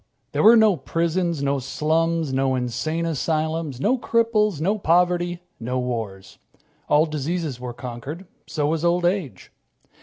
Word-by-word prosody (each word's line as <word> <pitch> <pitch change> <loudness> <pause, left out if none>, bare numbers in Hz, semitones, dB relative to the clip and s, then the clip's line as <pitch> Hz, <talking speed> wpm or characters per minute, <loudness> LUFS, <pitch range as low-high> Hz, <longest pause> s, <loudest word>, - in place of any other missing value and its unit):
There - - 0
were 225 +3 +8
no 215 -5 +5
prisons, 170 -2 -1
no 140 0 +1
slums, 155 +3 0
no 135 0 +1
insane 130 +7 -2
asylums, 155 -2 -1
no 245 - +1
cripples, 220 -7 +1
no 200 +7 0
poverty, 175 0 +1 0.2
no 125 +2 -3
wars. 115 -6 -4 0.5
All 150 +2 +5
diseases 155 -2 -3
were 125 0 -5
conquered. 125 +9 -7 0.2
So 150 -3 -1
was 160 +2 0
old 175 +1 +2
age. 175 -6 -2
160 Hz, 140 wpm, -23 LUFS, 135-175 Hz, 0.5 s, were